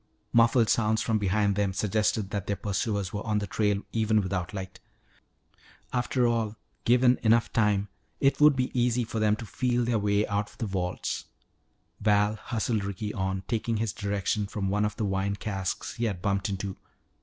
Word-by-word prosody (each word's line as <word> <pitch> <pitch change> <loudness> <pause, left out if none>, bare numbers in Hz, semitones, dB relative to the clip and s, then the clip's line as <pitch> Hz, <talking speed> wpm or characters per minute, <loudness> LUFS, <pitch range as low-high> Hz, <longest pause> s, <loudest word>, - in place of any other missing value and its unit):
Muffled 115 0 +5
sounds 110 -1 +2
from 110 -2 +1
behind 100 0 +1
them 100 -1 0
suggested 105 0 0
that 100 -2 -3
their 100 - 0
pursuers 100 -1 -2
were 105 - -3
on 110 -1 0
the 105 - -1
trail 105 +1 0
even 110 -1 +2
without 95 -3 -2
light. 95 -2 -7 1.1
After 125 0 +1
all, 115 -2 0 0.3
given 125 +1 +5
time - - -22 0.6
enough, 100 +1 -3 0.3
it 135 +1 +2
would 150 -1 +7
be 130 -1 -1
easy 125 0 +2
for 115 0 -4
them 105 -1 +3
to 115 - -8
feel 120 +1 0
their 115 -2 +1
way 100 0 +2
out 105 0 -1
of - - -19
the 115 - -2
vaults. 90 -3 -3 0.7
Val 105 0 +3
hustled 110 -1 -2
Ricky 100 +2 -4
on, 95 0 -2
taking 115 0 -1
his 110 -2 -1
direction 100 0 -1
from 100 -1 -3
one 105 +2 +1
of 105 - -2
the 110 - -2
wine 95 0 0
casks 95 -3 -3
he 120 - -2
had 100 -5 -2
bumped 100 +2 0
into. 95 -1 -4
105 Hz, 180 wpm, -28 LUFS, 100-115 Hz, 1.1 s, would